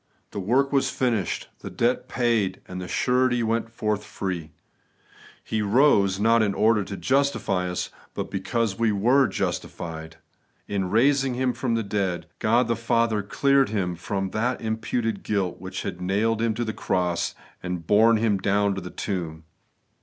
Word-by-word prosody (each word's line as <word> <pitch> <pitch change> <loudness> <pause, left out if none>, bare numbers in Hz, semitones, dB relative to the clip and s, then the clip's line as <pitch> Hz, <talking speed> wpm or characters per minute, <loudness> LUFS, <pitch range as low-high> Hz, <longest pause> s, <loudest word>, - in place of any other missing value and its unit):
The - - -4
work 130 +9 +1
was 135 - +3
finished, 115 -9 -1
the - - -7
debt 120 +2 0
paid, 115 -6 +1
and 90 0 -6
the 90 - -6
surety 125 +3 +2
went 115 +1 0
forth 105 -3 -2
free: 90 -7 -4 0.9
He 110 -1 -2
rose, 100 -4 +3
not 115 +2 +4
in 100 -2 +1
order 110 -1 +3
to 100 +1 -7
justify 105 -4 +1
us, 90 - -3 0.2
but - - -4
because 110 +2 -1
we 115 -2 +3
were 125 +7 +3
justified. 80 -4 -4 0.5
In 95 -2 -1
raising 135 +4 +3
Him 130 0 0
from 120 -2 -1
the 115 - 0
dead, 95 -5 -2
God 115 +2 +3
the 115 - +1
Father 115 -1 +1
cleared 135 +6 +2
Him 95 -5 -1
from 95 +2 -3
the 120 +3 0
im 110 -1 -2
puted 115 -1 -2
guilt 95 -5 -2
which 95 0 -5
had 90 -2 -5
nailed 105 +5 +1
Him 115 -2 +1
to 120 - -2
the 110 - -3
cross 90 -2 -1 0.3
and 90 -2 -4
borne 110 +5 +5
Him 105 -3 +1
down 100 +1 +2
to 95 - -4
the 90 - -7
tomb. 85 -6 -4
105 Hz, 170 wpm, -25 LUFS, 95-115 Hz, 0.9 s, borne